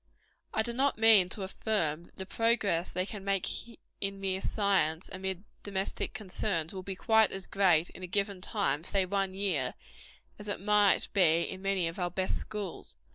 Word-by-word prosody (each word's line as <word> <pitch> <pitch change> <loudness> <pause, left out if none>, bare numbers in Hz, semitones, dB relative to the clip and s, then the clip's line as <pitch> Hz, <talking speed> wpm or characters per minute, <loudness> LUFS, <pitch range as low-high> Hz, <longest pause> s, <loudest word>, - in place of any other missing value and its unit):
I 220 - +1
do 235 - -1
not 275 +1 +2
mean 220 -5 +6
to 195 - -3
affirm, 175 -5 -1
that - - -25
the 190 - -4
progress 205 -6 +1
they 185 - -1
can 205 -1 -7
make 195 -1 0 0.5
in 195 0 -3
mere 190 -1 -1
science, 190 -7 +1
amid 190 0 -4 0.2
domestic 195 +2 -3
concerns, 190 -6 -2
will 190 - -5
be 190 +1 -5
quite 220 +2 +4
as 195 0 -5
great 180 -5 +3
in - - -12
a 185 - -5
given 200 0 -1
time 195 -7 -1
say 195 +1 +1
one 195 0 -1
year 175 -11 0 0.6
as 210 - -8
it 205 - -2
might 205 0 +3
be 170 -4 +4
in 190 - -6
many 195 -3 +1
of 165 +3 -6
our 175 -1 0
best 185 +2 -1
schools. 205 -5 -6
195 Hz, 185 wpm, -30 LUFS, 180-205 Hz, 0.6 s, mean